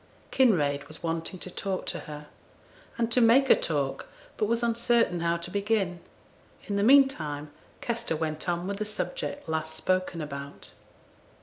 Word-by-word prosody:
Kinraid 145 - +2
was 155 +3 -7
wanting 165 +3 -2
to 185 - -5
talk 190 +1 -3
to - - -2
her, 150 0 -8 0.7
and 230 -1 0
to 250 - +4
make 255 +4 +5
her - - +10
talk, 145 -4 -2 0.3
but 210 - 0
was 235 +2 0
uncertain 235 -5 +2
how 170 0 +1
to 170 +1 -5
begin. 200 -3 0 0.6
In 205 - -3
the 200 - +1
meantime 185 - +3 0.3
Kester 235 -7 -2
went 155 +2 -3
on 175 0 -1
with 200 +1 -3
the 215 - -2
subject 290 - -4
last 160 0 -2
spoken 185 +1 0
about. 140 -2 -7
185 Hz, 160 wpm, -28 LUFS, 160-230 Hz, 0.7 s, her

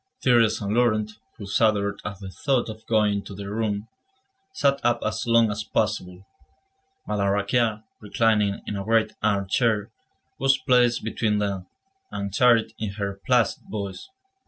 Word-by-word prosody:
Thérèse 120 -4 +4
and 100 +1 -2
Laurent, 110 -3 +2 0.3
who 100 - -8
shuddered 100 -1 +1
at 100 -2 -6
the 95 -1 -8
thought 125 +5 0
of 110 0 -9
going 105 -2 +2
to 100 - -10
their 100 0 -7
room, 105 -1 -2 0.6
sat 140 - +1
up 120 0 +2
as 110 +4 -2
long 115 -2 +4
as 105 +1 -4
possible. 90 -2 -2 0.8
Madame 100 -2 0
Raquin, 105 +2 +1 0.2
reclining 105 -1 +1
in 105 - -4
a 100 - -4
great 110 0 +2
armchair, 105 +1 +1 0.5
was 135 +1 +3
placed 125 -3 +2
between 110 -1 0
them, 100 -3 -2 0.4
and 100 -1 -5
chatted 120 -1 +4
in 105 -2 -3
her 100 -1 -4
placid 125 -4 +2
voice. 100 - -6
105 Hz, 150 wpm, -24 LUFS, 100-115 Hz, 0.8 s, Thérèse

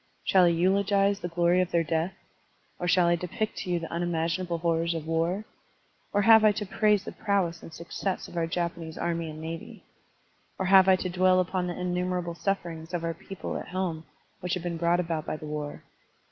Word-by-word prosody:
Shall 185 -2 +5
I - - +5
eulogize 195 +3 +2
the 175 - -4
glory 175 +1 +2
of 180 - -1
their 170 -2 +2
death? 165 +3 -1 0.6
or 175 - -2
shall 180 0 +4
I 170 0 +4
depict 180 +5 -3
to - - -5
you 175 - +2
the 165 -1 -6
unimaginable 170 +1 -1
horrors 165 0 0
of 160 -2 -4
war? 165 +6 0 0.7
or 205 0 +2
have 220 +1 +8
I 215 - +7
to 210 0 -3
praise 210 0 +2
the - - -6
prowess 185 -5 -1
and - - -11
success 170 +3 -4
of - - -12
our 165 -1 0
Jap 170 0 -1
anese 165 -2 -9
army 170 -1 -1
and 155 0 -8
navy? 165 +1 -7 0.7
or 190 - -1
have 190 0 +7
I 190 - +7
to 185 0 -3
dwell 185 +1 +3
upon 185 0 0
the 175 - -4
innumerable 180 -1 -1
sufferings 170 -2 -3
of 170 - -3
our 165 0 -1
people 190 +3 -6
at - - -7
home 180 -4 -3 0.4
which 180 0 -2
have 180 - -5
been 170 -1 -3
brought 170 +1 +2
about 165 -3 -2
by - - -2
the 155 - -9
war? 150 -1 -5
175 Hz, 210 wpm, -28 LUFS, 165-185 Hz, 0.7 s, have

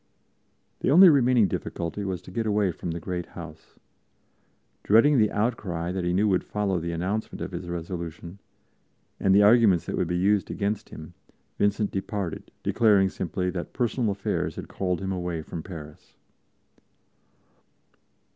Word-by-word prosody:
The - - 0
only 180 +6 +9
remaining 125 -7 +4
difficulty 85 +3 -4
was 95 -3 -4
to - - -12
get 110 +3 -2
away 105 -3 +2
from 85 - -6
the 85 +1 -3
great 90 0 -4
house. 85 -2 -11 1.0
Dreading 120 +6 +5
the 105 -1 +3
outcry 100 -6 -2
that 95 -1 -3
he 90 - 0
knew 100 +4 +2
would 95 -3 +2
follow 100 -3 -1
the 85 +1 -4
announcement 95 +6 -3
of - - -5
his 90 - -6
resolution, 85 +1 -6 0.8
and 95 0 +3
the 105 - +6
arguments 105 -5 +5
that - - -3
would - - 0
be 90 +1 -1
used 100 +2 +2
against 105 +1 -2
him, 80 +3 -10 0.5
Vincent 105 +1 +1
departed, 95 -3 -4
declaring 100 -4 +3
simply 90 0 -3
that 90 -1 -6
personal 120 -2 0
affairs 100 -1 -2
called 90 -2 -2
him 95 0 -3
away 90 -3 -3
from 80 - -6
Paris. 80 -4 -11
95 Hz, 150 wpm, -26 LUFS, 85-105 Hz, 1.0 s, only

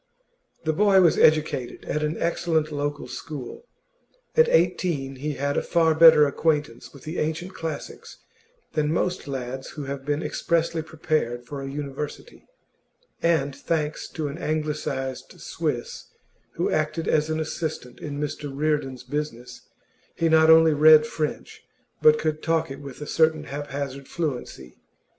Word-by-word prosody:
The 155 -1 0
boy 200 +2 +5
was 170 -3 +4
educated 150 -5 +2
at 150 - -2
an 150 +1 -1
excellent 165 -2 0
local 145 0 -3
school; 155 - -8 0.7
at 475 0 +5
eighteen 150 - +1
he 150 +3 -3
had 140 +1 -1
a - - +2
far 165 -2 +2
better 160 -2 +8
acquaintance 145 -4 -1
with 140 - -15
the 155 +3 -4
ancient 165 +4 -2
classics 165 -1 -7 0.6
than 150 -1 +1
most 180 0 -1
lads 130 -1 -5
who 150 - -4
have 140 0 -5
been 145 +3 -1
expressly 165 -1 0
prepared 155 -6 -2
for 140 +2 -6
a 135 - -5
university, 145 - -7 0.7
and, 155 -5 +1
thanks 150 +1 -2
to 155 -2 -2
an 145 +4 -6
anglicised 150 -4 -3
Swiss - - -4 0.5
who - - -1
acted 155 +1 -1
as 155 0 +2
an 155 0 -1
assistant 155 -6 -4
in 145 -1 -5
Mr 150 0 -4
Reardon's 140 -3 -1
business, 125 -2 -6 0.5
he 165 - +1
not 160 0 +5
only 160 -1 +7
read 155 +1 +7
French, 155 -1 -4 0.4
but 155 0 +6
could 155 0 -2
talk 160 -2 0
it 135 - -7
with 140 -1 -10
a - - -4
certain 160 0 +2
haphazard 140 -2 -5
fluency. 130 - -5
150 Hz, 145 wpm, -25 LUFS, 140-160 Hz, 0.7 s, better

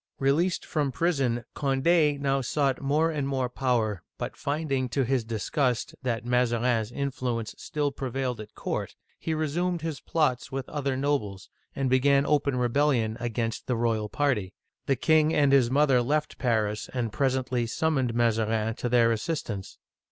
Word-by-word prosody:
Released 155 +7 +1
from 145 -3 -1
prison, 130 -7 0
Cond6 145 +2 +2
now 135 -1 +1
sought 135 +1 0
more 150 +4 +2
and 145 -3 -2
more 130 -2 -1
power, 120 -7 0 0.2
but - - -5
finding, 140 -3 -1
to 135 +3 +1
his 130 -1 +1
disgust, 120 +3 -1
that 120 -3 -2
Mazarin's 120 -2 +1
influence 125 -5 -3
still 145 -2 -1
prevailed 130 -3 -3
at 105 - -12
court, - - -4 0.2
he 160 - -2
resumed 165 +3 -1
his 160 -5 -3
plots 140 -6 0
with 135 -1 -4
other 140 -3 -2
nobles, 115 -9 -2 0.2
and 135 -1 0
began 140 +2 +4
open 145 -2 +1
rebellion 125 -2 +2
against 115 -1 -3
the 125 - +1
royal 115 -2 0
party. 110 -11 0 0.3
The 135 - +3
king 155 +2 +3
and 145 -2 +4
his 135 -4 +5
mother 135 -2 +4
left 150 +5 -1
Paris, 110 -3 0
and 115 -4 -2
presently 130 -3 0
sum 160 +7 0
moned 125 -3 0
Mazarin 115 -1 +1
to 120 - -2
their 120 -1 +4
assistance. 110 - -3
130 Hz, 155 wpm, -27 LUFS, 115-145 Hz, 0.3 s, his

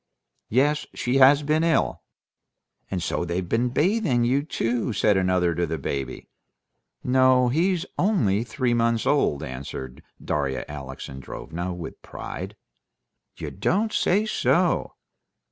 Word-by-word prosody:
"Yes, 145 +5 +2
she 125 +2 0
has 140 +2 +6
been 155 +2 +1
ill." 165 -1 +1 0.9
"And 90 -3 -2
so - - -1
they've 85 +1 -2
been 120 +6 +1
bathing 150 - +2
you 130 +4 +2
too," 120 -5 -1
said 105 0 +3
another 90 -2 +2
to 85 +1 -1
the 80 +1 -2
baby. 70 -2 -4 0.8
"No; 130 -1 +4
he's 175 +6 +1
only 115 - +2
three 125 -1 -1
months 115 -1 +1
old," 110 - +2
answered 65 0 -7 0.2
Darya 70 -3 -2
Alexandrovna 75 +5 -6
with 85 -2 -8
pride. - - -7 0.8
"You - - -5
don't 215 +4 0
say 205 +4 +2
so!" 215 - +1
120 Hz, 125 wpm, -25 LUFS, -, 0.9 s, has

